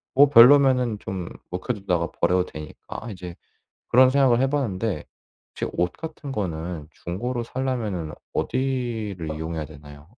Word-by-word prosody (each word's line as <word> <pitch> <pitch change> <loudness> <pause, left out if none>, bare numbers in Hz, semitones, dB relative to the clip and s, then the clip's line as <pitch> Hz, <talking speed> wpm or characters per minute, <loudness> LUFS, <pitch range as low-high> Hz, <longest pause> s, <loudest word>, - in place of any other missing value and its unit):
뭐 140 +1 +7
별로면은 125 -3 +7
좀 95 -2 -5 0.2
묵혀두다가 90 -4 -1
버려도 90 0 +3
되니까 75 +8 -9
이제 90 -3 -8 0.5
그런 130 +1 +6
생각을 130 -3 +4
해봤는데. 115 - -1 0.5
혹시 - - -3
옷 90 0 +1
같은 155 -3 -7
거는 85 - -4
중고로 120 +8 -4
사려면은 115 -11 -3 0.2
어디를 115 -11 -2
이용해야 80 0 -4
되나요? 75 -1 -13
105 Hz, 305 characters per minute, -24 LUFS, 85-130 Hz, 0.5 s, 뭐